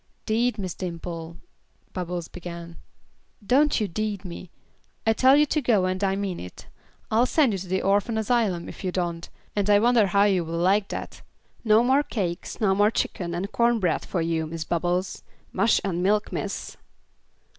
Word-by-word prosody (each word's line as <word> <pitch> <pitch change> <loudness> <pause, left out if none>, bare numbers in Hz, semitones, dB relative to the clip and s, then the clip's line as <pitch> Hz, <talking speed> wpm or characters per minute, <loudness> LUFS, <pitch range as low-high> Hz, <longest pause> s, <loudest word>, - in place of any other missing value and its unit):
"'Deed, 235 +1 +1
Miss 185 -4 -4
Dimple" 170 -2 -6 0.6
Bubbles 175 -2 -4
began. 170 -1 -9 0.7
"Don't 285 +6 +3
you 210 - 0
'deed 205 +1 -3
me. 175 0 -8 0.6
I 225 - +4
tell 260 +4 +5
you 300 - +5
to 305 +1 0
go 220 -7 +2
and 185 +1 -2
I 195 0 +2
mean 195 -3 -3
it. 90 - -10 0.5
I'll 230 +3 +3
send 275 -7 +3
you 195 - -2
to 185 - -7
the 190 +1 -1
orphan 205 +3 +1
asylum, 215 -6 0
if - - -10
you 185 - -1
don't, 175 -2 -3 0.3
and 205 0 0
I 205 - +7
wonder 230 -1 +4
how 200 +2 +3
you 195 -4 +2
will 165 +1 -4
like 195 +4 +2
that; - - -6 0.4
no 220 0 +5
more 265 +3 +4
cakes, 185 -11 -4
no 200 -3 +3
more 205 +2 +4
chicken 175 -5 -2
and 195 +4 -3
corn 235 0 +2
bread 180 -5 0
for 180 - -2
you, 165 -1 -1
Miss 165 0 -5
Bubbles. 175 +3 -1 0.3
Mush 230 - +3
and 180 -3 -1
milk, 205 +3 +1
miss." - - -4
195 Hz, 180 wpm, -25 LUFS, 175-220 Hz, 0.7 s, I